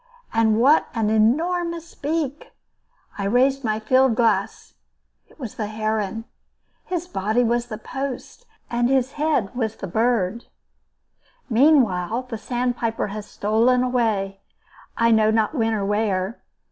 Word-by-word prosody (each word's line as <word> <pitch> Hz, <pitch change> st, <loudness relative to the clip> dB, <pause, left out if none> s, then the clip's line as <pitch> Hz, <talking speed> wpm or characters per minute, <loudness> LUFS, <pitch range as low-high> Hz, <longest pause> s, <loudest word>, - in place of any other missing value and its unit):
And 225 Hz, -1 st, +3 dB
what 280 Hz, +6 st, +4 dB
an 220 Hz, -2 st, +1 dB
enormous 335 Hz, +9 st, +1 dB
beak! 295 Hz, -1 st, -3 dB, 0.7 s
I 200 Hz, -, -1 dB
raised 265 Hz, +6 st, +2 dB
my 215 Hz, -2 st, 0 dB
field 255 Hz, +2 st, +3 dB
glass. 225 Hz, -2 st, 0 dB, 0.5 s
It -, -, -24 dB
was 245 Hz, -7 st, -6 dB
the 215 Hz, -, -4 dB
heron. 215 Hz, 0 st, -2 dB, 0.6 s
His 355 Hz, -1 st, -3 dB
body 215 Hz, -, 0 dB
was 240 Hz, +1 st, 0 dB
the 215 Hz, -3 st, -6 dB
post, 270 Hz, -, -6 dB, 0.2 s
and 240 Hz, +1 st, 0 dB
his 265 Hz, -1 st, +2 dB
head 295 Hz, -9 st, 0 dB
was 225 Hz, -3 st, -2 dB
the -, -, -7 dB
bird. 225 Hz, +1 st, 0 dB, 1.1 s
Meanwhile, 230 Hz, -, +3 dB
the 240 Hz, -3 st, -7 dB
sandpiper 240 Hz, -3 st, -2 dB
has 210 Hz, +1 st, -7 dB
stolen 230 Hz, +5 st, +2 dB
away, 220 Hz, -6 st, 0 dB, 0.6 s
I 230 Hz, 0 st, +3 dB
know 220 Hz, -1 st, +4 dB
not 220 Hz, +3 st, +1 dB
when 225 Hz, -6 st, 0 dB
or 200 Hz, -2 st, -2 dB
where. 205 Hz, 0 st, -1 dB
230 Hz, 135 wpm, -22 LUFS, 215-260 Hz, 1.1 s, what